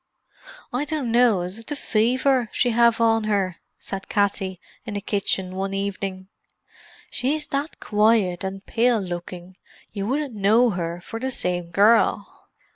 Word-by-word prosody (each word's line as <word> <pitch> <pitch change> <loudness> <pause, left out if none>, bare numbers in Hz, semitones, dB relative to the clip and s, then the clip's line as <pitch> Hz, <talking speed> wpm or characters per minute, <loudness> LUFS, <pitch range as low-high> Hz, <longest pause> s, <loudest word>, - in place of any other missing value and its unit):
"I 260 +4 0
dunno 245 - +2
is 180 +5 -4
it 230 - -13
the 295 - -2
fever 250 +1 +1
she 245 - +1
have 235 0 +4
on 225 -1 +3
her," 195 -4 0 0.2
said 195 0 -7
Katty 195 -3 0 0.2
in 215 -3 -6
the - - -1
kitchen 195 -2 -1
one 195 +1 -3
evening. 195 -1 -4 0.8
"She's 295 +4 0
that 280 +3 -3
quiet 210 -4 +2
and 195 +1 -5
pale 235 0 +2
looking 180 0 -7 0.4
you 200 -1 -3
wouldn't 280 +1 -1
know 220 +4 +3
her 170 -1 -4
for 225 - -7
the 260 +2 -2
same 180 -8 -2
gerrl." 210 +6 +4
210 Hz, 145 wpm, -23 LUFS, 190-235 Hz, 0.8 s, have